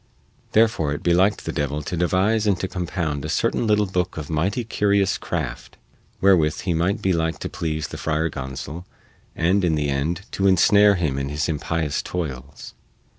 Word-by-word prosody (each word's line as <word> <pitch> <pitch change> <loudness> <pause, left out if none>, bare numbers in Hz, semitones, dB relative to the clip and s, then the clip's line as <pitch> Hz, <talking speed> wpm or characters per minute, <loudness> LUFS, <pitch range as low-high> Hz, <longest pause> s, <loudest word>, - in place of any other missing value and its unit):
Therefore 110 -10 +3
it 75 - -6
beliked 90 +4 +3
the - - -2
devil 75 +1 -2
to 90 - -4
devise 95 +6 +1
and 95 -3 +2
to 95 - -2
compound 85 -6 -3
a - - -4
certain 115 - 0
little 105 -1 +3
booke 90 -2 -2
of 75 -2 -5
mighty 95 +10 0
curious 100 -3 +1
craft, - - -5 0.4
wherewith 85 -6 +3
he 90 -2 -1
might 95 +7 0
be 95 - +2
like 80 -1 -1
to - - -5
please 80 -2 -3
the - - -7
Friar 80 +1 0
Gonsol 70 +4 -6 0.5
and, 90 +4 +2
in 85 -3 +2
the 75 -1 -1
end, 80 +7 -1
to 100 - +1
ensnare 100 +2 +5
him 75 -7 -1
in 70 0 -3
his 75 +1 -1
impious 80 -1 -1
toils. 70 -5 -6
85 Hz, 180 wpm, -23 LUFS, 75-95 Hz, 0.5 s, ensnare